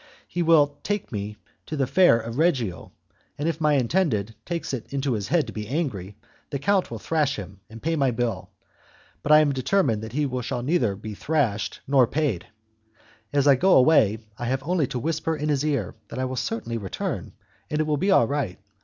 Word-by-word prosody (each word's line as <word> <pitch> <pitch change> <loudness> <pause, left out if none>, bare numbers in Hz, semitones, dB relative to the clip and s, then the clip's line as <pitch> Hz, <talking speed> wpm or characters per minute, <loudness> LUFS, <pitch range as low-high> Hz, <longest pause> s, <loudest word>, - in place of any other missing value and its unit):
He 175 - -3
will 150 -4 +4
take 205 -1 -3
me 105 -1 -4 0.3
to 155 - -4
the 135 - +2
Fair 175 -4 +5
of 115 +3 -5
Reggio, 130 - 0 0.5
and 145 - -2
if 165 -1 -2
my 150 -1 +3
intended 125 - +1
takes 170 -4 -3
it 120 -4 -5
into 140 -1 -1
his 100 -3 -3
head 165 0 +2
to - - -8
be 105 -1 -5
angry, 105 - -3 0.3
the 140 - -2
count 195 +6 +1
will - - -5
thrash 150 -4 0
him 100 -1 -8
and 115 +1 -12
pay 165 +1 +1
my 140 -4 +2
bill, 120 -1 -2 0.7
but 145 - -1
I 155 0 +9
am 150 -2 +2
determined 130 - +1
that 110 +1 -7
he 145 +1 +1
shall 120 0 -3
be 140 - -2
neither 115 - +2 0.2
thrashed 130 -7 -1
nor 135 -3 +5
paid. 135 - -1 0.8
As 140 -1 +2
I 140 - +8
go 185 +9 +4
away, 125 -6 +5 0.2
I 120 - -3
have 130 +2 -1
only 165 -2 +1
to 125 - -4
whisper 160 +4 -1
in 150 +1 -2
his 145 -1 +1
ear 140 -11 -1
that - - -8
I 130 - 0
will 130 0 -3
certainly 115 -1 -3
return, 95 -3 -4 0.4
and 150 - -1
it - - +3
will 150 -1 0
be 190 +7 0
all 190 -11 +5
right. 140 -10 -2
135 Hz, 205 wpm, -25 LUFS, 115-155 Hz, 0.8 s, I